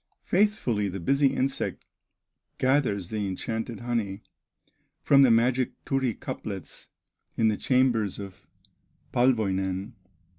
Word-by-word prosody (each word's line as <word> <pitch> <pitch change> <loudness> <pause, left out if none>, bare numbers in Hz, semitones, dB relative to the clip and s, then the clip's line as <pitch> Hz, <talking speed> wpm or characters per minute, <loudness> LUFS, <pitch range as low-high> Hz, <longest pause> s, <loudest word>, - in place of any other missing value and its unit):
Faithfully 175 - +1
the 95 +1 -5
busy 140 - +3
insect 135 0 -2 0.7
Gathers 130 -9 +1
the 105 -2 -2
enchanted 110 +3 -4
honey 110 -4 -2 0.8
From 140 -1 +6
the 135 - +6
magic 125 +2 +2
Turi 135 -4 0
cuplets 95 -6 -7 0.5
In 110 -1 +4
the 105 - +1
chambers 120 -5 +1
of 100 -2 -10 0.7
Palwoinen. 100 -4 +1
115 Hz, 105 wpm, -27 LUFS, 100-130 Hz, 0.8 s, From